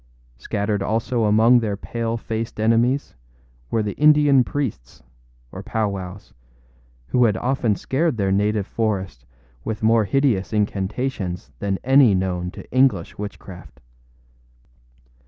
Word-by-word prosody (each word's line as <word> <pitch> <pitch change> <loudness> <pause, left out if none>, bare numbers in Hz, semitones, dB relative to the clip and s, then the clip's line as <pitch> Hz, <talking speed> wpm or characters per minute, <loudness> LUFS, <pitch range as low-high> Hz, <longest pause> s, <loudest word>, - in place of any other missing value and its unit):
Scattered 100 - -2
also 115 +3 0
among 110 +4 +5
their 105 -4 -2
pale 115 +2 -3
faced 115 0 -5
enemies 115 +5 +1 0.6
were 110 - 0
the 105 -1 -3
Indian 145 -3 +5
priests, 100 - -5 0.5
or - - -8
powwows, 100 -3 -4 0.8
who 125 -1 +3
had 105 -4 +1
often 125 -4 0
scared 145 +3 -1
their 100 -2 0
native 105 +1 +1
forest 95 - -3 0.4
with 110 -1 -4
more 110 0 +4
hideous 125 -6 0
incantations 100 - -2
than 100 -1 -1
any 130 -5 +5
known 90 -1 -2
to - - -11
English 125 -11 +1
witchcraft. 95 -8 -9
110 Hz, 120 wpm, -22 LUFS, 100-120 Hz, 0.8 s, among